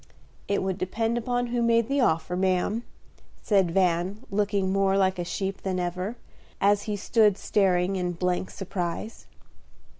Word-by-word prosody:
"It 200 - 0
would 190 0 -2
depend 225 +5 -1
upon 245 +1 -1
who 240 - +1
made 230 -1 +3
the 275 +1 +1
offer, 165 -4 +1
ma'am," 185 +4 +1 0.6
said 195 -4 +3
Van, 185 +4 +1
looking 200 -1 0
more 195 0 +2
like 190 -1 +2
a - - 0
sheep 190 +3 -3
than 185 -1 -2
ever, 180 +5 -3 0.4
as 205 +1 +3
he 210 - 0
stood 210 -1 +3
staring 190 -1 +1
in 180 -1 -1
blank 180 +1 -1
surprise. 185 +2 -5
195 Hz, 150 wpm, -26 LUFS, 180-210 Hz, 0.6 s, made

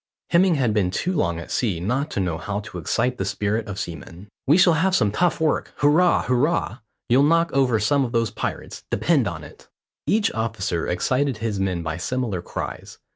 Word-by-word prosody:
Hemming 175 0 +4
had 125 -6 +1
been 100 -4 +1
too 175 - -2
long 85 - 0
at 85 - -8
sea 105 -9 0
not 125 - -1
to - - -3
know 85 -4 -1
how 105 +2 -3
to 90 -4 -8
excite 125 +9 -1
the - - 0
spirit 105 +3 -2
of 100 -2 -6
seamen. 85 +3 -7 0.2
"We 150 +5 +5
shall 175 -2 +6
have 185 +4 +2
some 105 - +2
tough 170 - +1
work, 160 -1 0
hurrah! 160 +5 +4
hurrah! 130 -1 0 0.3
You'll 125 +3 +4
knock 165 +3 +3
over 130 -5 +2
some 140 +6 +2
of 120 - -3
those 115 -2 0
pirates, - - -5
depend - - +2
on - - -5
it." - - -15 0.4
Each 210 0 +2
officer 110 -6 -2
excited 130 +7 0
his 105 -2 -3
men 95 -3 -1
by 80 0 -3
similar 110 -1 -2
cries. - - -6
115 Hz, 195 wpm, -23 LUFS, 95-145 Hz, 0.4 s, shall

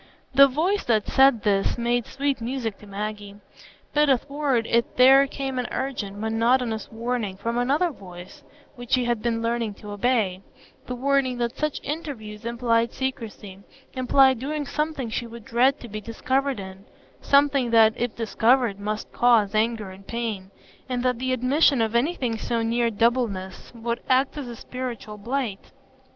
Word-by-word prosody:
The 275 +1 +8
voice 340 +10 0
that 220 -3 +2
said 265 -5 +4
this 200 0 +1
made 240 0 0
sweet 275 -2 -2
music 230 -3 -3
to 210 - -14
Maggie; 205 0 -5 0.6
but 300 -1 +3
athwart 275 -2 +1
it 235 +1 0
there 270 +2 +7
came 270 -2 -4
an 250 - -2
urgent, 220 -7 -4
monotonous 225 +1 0
warning 225 -4 -3
from 230 +4 -3
another 290 +8 +1
voice 180 - -12 0.3
which 245 -1 -7
she 255 -1 +3
had 240 -2 0
been 230 -1 -1
learning 230 -2 -1
to 210 0 -10
obey,—the 205 +1 -3
warning 265 -1 +1
that 235 0 -2
such 305 -1 -2
interviews 235 -9 -6
implied 235 -1 +1
secrecy; 225 -7 -5 0.3
implied 260 0 +4
doing 295 +3 -3
something 300 -6 -3
she 235 +1 -3
would 230 -1 -11
dread 255 +5 +2
to 240 - -8
be 215 -1 -6
discovered 260 +4 -1
in, 190 0 -9 0.4
something 280 -3 +3
that, 225 -1 +6
if 240 -1 -3
discovered, 230 -1 +2
must 210 +1 -4
cause 225 -4 +3
anger 215 -2 0
and 195 +1 -14
pain; 220 -5 -4 0.4
and 250 -1 -2
that 250 -2 0
the 260 0 -1
admission 260 +3 +3
of 225 -1 0
anything 240 -3 0
so 230 0 -1
near 235 +1 +1
doubleness 220 -4 -1
would 235 0 -3
act 260 +1 +2
as 290 -4 -5
a 240 - -7
spiritual 235 -4 -7
blight. 235 -3 -3
235 Hz, 160 wpm, -24 LUFS, 220-265 Hz, 0.6 s, The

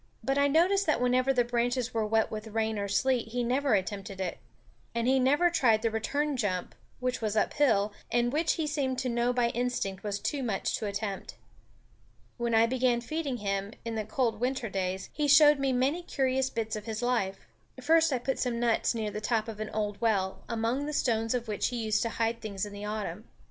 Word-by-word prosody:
But 270 +3 +1
I 285 - +4
noticed 365 +7 +3
that 310 - +2
whenever 250 +2 +2
the 250 -2 +3
branches 245 +1 0
were 220 -2 0
wet 220 0 +1
with 215 0 -5
rain 220 0 -1
or 200 - -2
sleet 245 +3 +1
he 245 +2 -2
never 255 0 +2
attempted 195 0 -3
it; 185 -2 -3 0.6
and 235 +1 0
he 265 +1 +4
never 290 +7 +3
tried 235 -9 +3
the 230 - +1
return 285 +7 -1
jump, 185 -6 -2 0.3
which 250 -1 -2
was 215 -1 -1
uphill, 215 -5 +2 0.2
and 240 +1 +1
which 320 +2 +2
he 320 - -2
seemed 280 -4 -1
to 255 0 -1
know 240 +1 +1
by 245 -1 +1
instinct 235 -6 -2
was 205 -1 -2
too 280 +7 -2
much 220 -7 -1
to 215 - -3
attempt. 200 -1 -4 1.0
When 235 -1 0
I 225 +1 +6
began 250 0 +1
feeding 285 +1 -3
him, 200 0 -2
in 230 - -3
the 220 -1 -2
cold 225 0 -1
winter 250 -1 -1
days, 190 0 -3
he 300 -1 0
showed 295 0 +7
me 275 -1 +1
many 265 +7 +1
curious 265 -5 0
bits 225 -2 -3
of 210 - -6
his 220 +1 -3
life. 195 -6 -1 0.3
First 320 +3 +4
I 260 - +2
put 260 +2 -2
some 240 -2 -1
nuts 235 0 +1
near 215 -2 -2
the 210 - -5
top 225 0 0
of 220 -2 -7
an 215 0 -4
old 210 -1 -3
well, 195 -5 0
among 235 +5 -1
the 300 - -3
stones 225 -3 +1
of 240 -1 -3
which 210 -2 0
he 250 - -4
used 215 -2 0
to 230 - 0
hide 230 0 -1
things 200 -3 -3
in 205 - -9
the 205 +1 -6
autumn. 210 0 -4
235 Hz, 215 wpm, -29 LUFS, 215-260 Hz, 1.0 s, showed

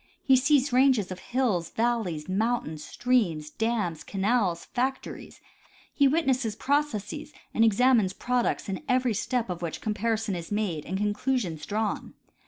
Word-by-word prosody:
He 265 - +5
sees 275 0 +3
ranges 255 -7 +4
of 185 - -6
hills, 230 -10 0
val 235 0 +1
le3''s, 160 -5 -5
mountains, 190 -6 -1
streams, 180 -12 0
dams, 215 -8 -1
canals, 195 -4 0
factories; 260 +1 -4 0.5
he 280 - +4
witnesses 265 -7 +1
processes 280 -7 -1 0.2
and 225 - +3
examines 225 -2 +4
products, 245 +1 -1
in 190 -2 -3
every 250 -2 +2
step 240 +3 -1
of 180 -2 -5
which 170 -2 -4
com 215 - -2
parison 220 0 -1
is 170 +1 -7
made 200 -8 -2
and 190 - -2
conclusions 205 - -1
drawn. 215 +1 -2
220 Hz, 145 wpm, -27 LUFS, 190-250 Hz, 0.5 s, He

